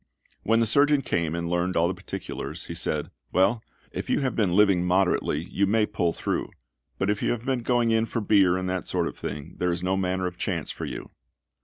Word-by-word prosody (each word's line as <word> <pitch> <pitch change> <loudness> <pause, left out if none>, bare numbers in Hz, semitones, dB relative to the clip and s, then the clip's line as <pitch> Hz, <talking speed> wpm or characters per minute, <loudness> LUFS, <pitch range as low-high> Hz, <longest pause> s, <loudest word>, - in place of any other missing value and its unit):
When 115 +1 +3
the - - +3
surgeon 140 +4 +4
came 85 -1 -1
and 85 0 -2
learned 90 +1 0
all 85 +1 +4
the 95 - -1
particulars, 80 -2 -6
he - - -6
said, 75 -3 -1 0.2
"Well, 100 +5 +3 0.3
if - - -5
you - - +2
have 130 -2 -1
been 95 -6 +2
living 100 -3 +5
moderately, 90 -4 +1
you 100 +3 0
may 110 +2 +3
pull 90 -5 0
through; - - -2 0.5
but 100 +1 +1
if 105 - -2
you - - +1
have 120 0 -2
been 130 -2 0
going 120 -1 +2
in 110 0 +2
for 115 - -2
beer 100 -4 +4
and 95 0 -3
that 90 0 -2
sort - - 0
of - - -6
thing, 75 +3 -6
there 90 -1 +1
is 85 +1 -2
no 95 +1 +1
manner 95 -1 0
of 90 -1 -4
chance - - -2
for - - -5
you." - - -7
95 Hz, 225 wpm, -26 LUFS, 90-110 Hz, 0.5 s, living